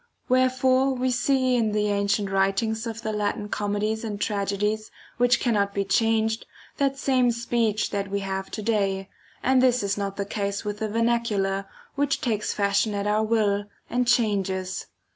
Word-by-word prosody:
Where 255 0 +4
fore 260 +1 +2
we 255 0 0
see 255 +1 +2
in 220 -3 +1
the 210 0 +1
ancient 200 0 0
writings 205 +4 +1
of 225 0 -6
the 215 - -2
Latin 210 0 -2
comedies 210 +2 -1
and 210 -3 -4
tragedies, 210 +1 -1 0.3
which 245 0 +4
cannot 200 -4 +1
be 200 0 0
changed, 220 +2 +1 0.3
that 275 -1 +1
same 260 -3 +2
speech 235 -2 0
that 200 -1 -2
we 200 0 -1
have 190 0 -3
to 215 - -5
day; 195 -3 0 0.3
and 260 0 +4
this 250 -3 +3
is 200 0 -1
not 200 -1 -3
the 200 - -2
case 200 0 -3
with 210 0 -3
the 220 - -1
vernacular, 210 -4 0 0.3
which 285 0 0
takes 215 -4 -1
fashion 205 +1 +1
at 200 0 -2
our 210 +1 +2
will, 210 -2 +1 0.3
and 245 0 +1
changes. 195 -5 0
215 Hz, 170 wpm, -25 LUFS, 200-235 Hz, 0.3 s, Where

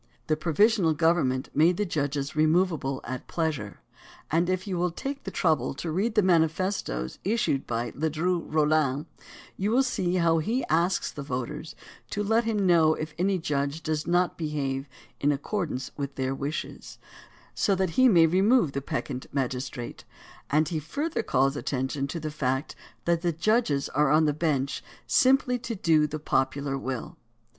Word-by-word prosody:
The 155 - +1
provisional 170 +2 +3
government 155 -5 +1
made 165 +4 +4
the 210 - 0
judges 145 -4 -2
removable 155 -4 +1
at 130 +1 -6
pleasure, 150 - -3 0.5
and 170 +3 +2
if 185 0 -1
you 195 -3 -3
will 180 +1 +1
take 275 +11 -6
the - - -3
trouble 160 -7 +1
to 165 +3 -4
read 210 +7 0
the 210 - +4
manifestoes 160 - 0
issued 200 -10 0
by 120 0 -2
Ledru 160 +3 -1
RoUin 150 -2 +2 0.5
you 200 +2 0
will 250 +4 +4
see 185 -8 -1
how 165 -2 +3
he 225 +11 -1
asks 170 +4 +1
the 145 - -7
voters 140 +3 -5 0.3
to 205 - -2
let 225 +3 +2
him 210 -3 0
know 165 -3 +5
if 155 0 -5
any 190 +1 +2
judge 145 -1 -2
does 155 -1 -2
not 175 +1 +1
behave 140 -3 -2 0.3
in 145 - +2
accord 170 +5 -2
ance 130 -2 -5
with 140 -1 -5
their 130 0 -1
wishes, 140 +3 -5 0.6
so 200 - +2
that 190 -2 0
he 255 +7 +5
may 170 -6 +6
remove 190 - +3
the 140 - -3
peccant 140 -3 -4
magistrate, 125 -2 -4 0.5
and 155 +2 +2
he 165 -3 -1
further 290 - -2
calls 135 +1 +1
attention 135 0 -2
to 165 +4 -4
the 155 -1 -4
fact 135 -1 -2 0.3
that 170 -1 +2
the 175 -1 +1
judges 165 - +1
are 150 0 +2
on 155 +2 +4
the 150 - +2
bench 145 -3 -1 0.2
simply 260 -1 +3
to 235 -1 -4
do 160 -5 +3
the 155 +1 -4
popular 135 -1 0
will. 130 -3 -5
155 Hz, 165 wpm, -27 LUFS, 140-185 Hz, 0.6 s, may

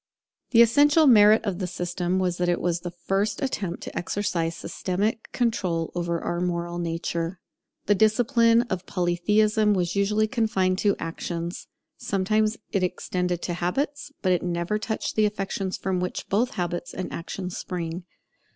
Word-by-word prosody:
The 235 -1 +7
essential 290 +6 +5
merit 215 -4 +6
of 195 -3 -2
the 185 - -2
system 175 +1 -2
was 180 -2 0
that 175 0 +1
it 175 - +1
was 175 -1 0
the 175 +1 -5
first 195 +4 -1
attempt 200 -10 -3
to - - -8
exercise 175 -3 -1
systematic 205 +7 -2
control 185 -9 0
over 170 -1 -1
our 175 +1 -2
moral 175 -1 -2
nature. 170 +1 -3 0.5
The 205 - +4
discipline 230 +2 +4
of 185 -6 -4
Polytheism 210 +4 +2
was 180 -1 -1
usually 210 +2 +2
confined 195 -6 +1
to 205 -2 +2
actions: 170 +1 -5 0.3
sometimes 215 +3 0
it 195 - +1
extended 180 -1 -2
to 175 - -2
habits; 280 - -2
but 185 - +3
it 180 - +2
never 175 +4 -1
touched 220 0 -3
the 215 -1 +4
affections 195 -2 -3
from 185 -1 -1
which 180 0 -3
both 240 +6 +1
habits 175 -1 -3
and 185 - -4
actions 180 +2 -5
spring. 175 0 -5
185 Hz, 155 wpm, -25 LUFS, 175-215 Hz, 0.5 s, The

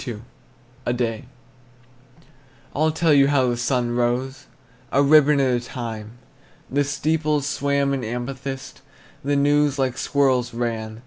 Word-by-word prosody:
A 120 - -1
DAY. 120 +1 -2 1.5
I'll 155 +3 +2
tell 160 0 +2
you 140 -1 +5
how 135 -3 +2
the - - -1
sun 120 0 0
rose, 130 +3 -1 0.4
A 140 - +3
ribbon 150 0 +5
at 130 -2 +2
a - - -13
time. 115 -3 -6 0.6
The 145 +2 +2
steeples 150 0 0
swam 140 -1 0
in 135 -2 -2
amethyst, 130 +3 -5 0.4
The 145 +1 0
news 145 0 +2
like 130 -2 -1
squirrels 130 -4 +1
ran. 110 -2 -3
135 Hz, 130 wpm, -22 LUFS, 120-145 Hz, 1.5 s, you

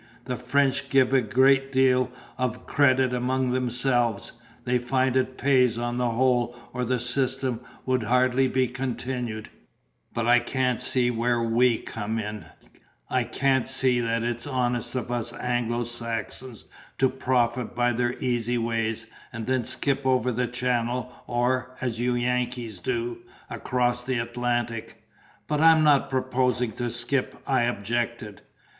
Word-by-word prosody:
"The 125 0 -2
French 135 +2 0
give 135 -1 +3
a 135 - +5
great 135 +4 +3
deal 130 -1 +3 0.3
of 125 -3 -3
credit 130 -3 +3
amongst 125 +1 0
themselves; 120 -3 +1 0.3
they 125 0 +2
find 130 +1 +1
it 130 0 0
pays 130 -4 +3
on 120 0 -2
the 125 -1 +1
whole, 120 0 +1 0.2
or 125 0 -2
the 125 +1 0
system 130 0 0 0.3
would 130 -1 +1
hardly 125 +3 +3
be 130 0 +1
continued; 125 -3 -4 0.6
but 115 - -2
I 120 +1 +6
can't 125 0 -1
see 125 -1 +1
where 120 +1 +1
WE 115 +1 +3
come 110 0 -4
in; 105 -1 -5 0.7
I 125 -2 +1
can't 130 +2 +1
see 130 -2 +2
that 115 -1 0
it's 120 +2 -3
honest 120 -2 -1
of 125 -1 -3
us 120 -1 -2
Anglo 120 -1 -1
Saxons 115 +1 -6 0.3
to 135 - +4
profit 125 -2 0
by 120 0 +2
their 120 +1 0
easy 120 -1 0
ways, 115 -1 -1 0.3
and 115 -2 -5
then 130 0 +1
skip 135 +3 -1
over 130 -1 +2
the 125 +1 -1
Channel 125 0 -1
or 130 +1 0
(as 120 -3 -3
you 125 0 +1
Yankees 120 -3 -2
do) 120 +2 -2 0.3
across 125 -1 0
the 130 0 -2
Atlantic." 120 -1 -3 0.4
"But 150 0 0
I'm 160 -1 +6
not 145 -2 +4
proposing 125 -2 0
to 120 +3 -3
skip," 120 +3 -1
I 130 -3 +2
objected. 120 -1 -3
125 Hz, 145 wpm, -26 LUFS, 120-130 Hz, 0.7 s, I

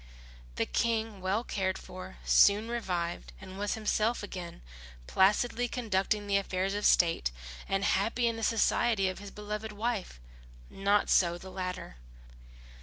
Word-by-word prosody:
The - - 0
King, 225 -3 -1
well 195 +5 0
cared 190 -5 -1
for, 185 +1 -10
soon 210 +3 +5
revived 180 -8 -3
and 190 0 -10
was 205 0 -1
himself 220 +1 0
again, 180 - -7 0.4
placidly 225 - +2
conducting 210 -3 -1
the 200 -1 +2
affairs 190 0 -1
of 205 0 +2
state, 165 - +3 0.4
and 195 +1 +1
happy 225 +5 +1
in 230 -1 +1
the 225 - -6
society 220 -2 +2
of 185 - -6
his 205 0 -8
beloved 210 +1 -5
wife. 210 - -3 0.5
Not 200 +1 +2
so 175 -1 +4
the 190 +1 -10
latter. 185 - -5
200 Hz, 140 wpm, -30 LUFS, 185-220 Hz, 0.5 s, soon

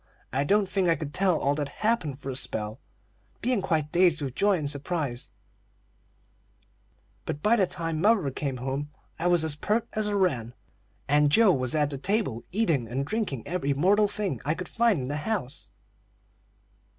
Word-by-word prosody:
I 135 +2 +1
don't 200 +6 +2
think 185 -1 +1
I 165 - +4
could 150 -3 -6
tell 185 -4 +2
all 140 - +1
that 145 -1 -2
happened 170 - -1
for 135 -1 -6
a - - -5
spell, 110 -2 0 0.6
being 245 -4 0
quite 160 -5 -1
dazed 175 -2 +4
with 135 -3 -3
joy 200 +5 +2
and 150 -3 -3
surprise; 140 -3 -3 1.9
but 145 - -5
by 220 +3 +5
the 195 -5 +2
time 165 -3 -3
mother 200 -8 +3
came 135 -1 -3
home 135 +3 -3 0.3
I 170 - 0
was 175 -2 +3
as 160 -2 -1
peart 215 +9 0
as 215 -1 0
a 205 -1 0
wren, 125 - 0 0.5
and 145 +1 +4
Joe 215 +2 +6
was 130 0 -1
at 150 -1 +1
the 140 - -5
table 165 - -1
eating 170 - +1
and 130 +4 -2
drinking 195 - -2
every 145 -6 -1
mortal 205 +8 +4
thing 200 - -3
I 155 +4 0
could 180 - -6
find 230 - +2
in 125 - -4
the 145 +2 -2
house. 150 - -4
155 Hz, 180 wpm, -27 LUFS, 140-200 Hz, 1.9 s, Joe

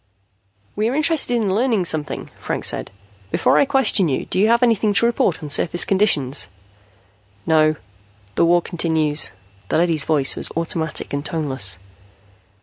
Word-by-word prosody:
"We 215 +2 0
are 255 - -3
interested 305 -4 +1
in 210 -5 0
learning 225 -3 +1
something," 155 -3 -4
Franks - - -1
said. - - -4 0.4
"Before - - +2
I - - +4
question 265 - +2
you, 130 - -2
do - - -2
you 210 - +4
have 235 +2 +3
anything 220 -3 +2
to 230 - +3
report 210 -9 0
on 150 - -6
surface 175 +4 +2
conditions?" 150 - +2 1.0
"No. 155 -1 +3 0.6
The - - +1
war 175 0 +3
continues." 160 -3 0 0.4
The - - +1
leady's 165 -3 +1
voice 145 -4 +2
was - - -2
automatic 165 -3 -2
and 140 0 -2
toneless. 140 - -1
170 Hz, 150 wpm, -20 LUFS, 155-220 Hz, 1.0 s, I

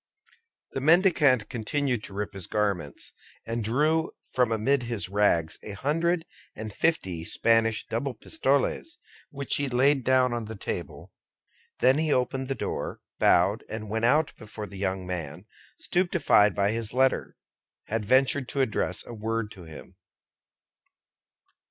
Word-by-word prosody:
The 135 - -3
mendicant 150 - +4
continued 125 0 -1
to - - -11
rip 105 0 -3
his 95 -4 -5
garments; 100 -8 -2 0.3
and 115 0 -3
drew 155 +8 +1 0.2
from 125 -3 +2
amid 125 +5 +2
his 115 -7 -3
rags 95 -5 +1
a 105 - -7
hundred 165 - 0 0.3
and 110 -1 -6
fifty 95 - 0
Spanish 115 +4 +2
double 125 +3 -3
pistoles, 350 - 0 0.3
which 140 -1 -2
he 140 -1 -1
laid 135 +2 +3
down 130 -1 +3
on 120 -2 -3
the 110 +1 -7
table; 100 - -6 0.7
then 130 +4 +5
he 155 -1 +1
opened 130 0 0
the 135 - -2
door, - - -4 0.2
bowed, 95 +5 +3
and 110 -1 -6
went 110 +1 0
out 150 +5 +3
before 110 -1 -8
the 100 -2 -10
young 95 -1 -2
man, 90 -1 -5 0.3
stupefied 175 - +3
by 100 +1 +2
his 115 -1 -3
letter, 130 +1 +1 0.5
had 110 0 -2
ventured 130 +4 +2
to 140 - 0
address 120 -6 -1
a - - -9
word 110 0 -3
to 90 -3 -11
him. 80 -2 -12
115 Hz, 145 wpm, -27 LUFS, 105-140 Hz, 0.7 s, then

